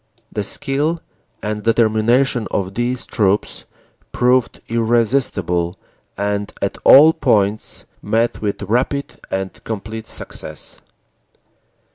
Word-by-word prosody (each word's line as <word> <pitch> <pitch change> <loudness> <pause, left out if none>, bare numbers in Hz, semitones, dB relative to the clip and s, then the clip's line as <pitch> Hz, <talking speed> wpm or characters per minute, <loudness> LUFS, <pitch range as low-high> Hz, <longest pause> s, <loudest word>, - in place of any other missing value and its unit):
The 105 - -2
skill 145 - -1 0.4
and 105 0 -2
determination 115 +2 +2
of 95 -1 -2
these 120 +3 -1
troops 100 -1 0 0.5
proved 125 0 +2
irresistible 115 -7 +1 0.4
and 100 0 -1
at - - -2
all 155 +4 +9
points 105 -6 +1 0.2
met 115 +3 0
with 105 -1 -2
rapid 125 +7 -1
and 95 0 -4
complete 110 +1 -5
success." - - -7
110 Hz, 95 wpm, -19 LUFS, 100-125 Hz, 0.5 s, all